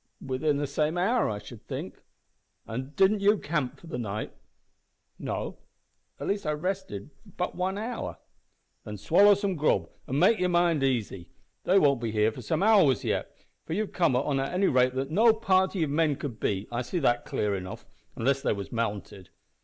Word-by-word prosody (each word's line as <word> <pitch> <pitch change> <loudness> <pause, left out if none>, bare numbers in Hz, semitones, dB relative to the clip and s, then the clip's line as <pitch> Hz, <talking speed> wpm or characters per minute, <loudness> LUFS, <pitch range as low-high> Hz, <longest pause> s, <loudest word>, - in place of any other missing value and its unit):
"Within 140 +3 -1
the 145 - -1
same 150 +4 -1
hour, 225 +7 +2
I 105 - -3
should - - -11
think." - - -6 0.6
"An' 130 +5 -6
did 200 +2 +3
you 205 +2 +4
camp 150 -7 -2
for - - -15
the 160 -7 -5
night?" 105 -2 -4 0.9
"No. - - -4 0.6
At - - -5
least 200 -4 -1
I 150 - +1
rested 155 - -4 0.3
but 180 - -2
one 185 +2 -2
hour." 230 +3 -4 0.7
"Then 105 0 -7
swallow 200 - +5
some 200 -1 -1
grub 155 -3 +1 0.2
an' 135 - -1
make 215 +7 +4
your 180 0 +1
mind 175 -3 +2
easy. 115 -9 -1 0.4
They 190 - +4
won't 140 -8 +4
be 115 - -2
here 110 0 +2
for 125 - -9
some 160 - -1
hours 195 - +5
yet, - - -2 0.3
for - - -3
you've 210 +3 -2
come 165 -8 +2
on 135 +2 +1
at 135 +7 -2
a 195 - +4
rate 130 -1 +3
that 135 +2 -2
no 220 +6 +5
party 190 -4 +2
of 145 - -2
men 155 -1 +2
could 125 -6 -6
beat, 100 0 -1
I 120 +1 -1
see 125 +9 -4
that 120 -7 +2
clear 105 -1 -1
enough 95 -1 -7 0.3
unless 135 +3 +1
they - - +1
was 100 -1 -6
mounted." 105 -5 -4
150 Hz, 190 wpm, -28 LUFS, 120-185 Hz, 0.9 s, swallow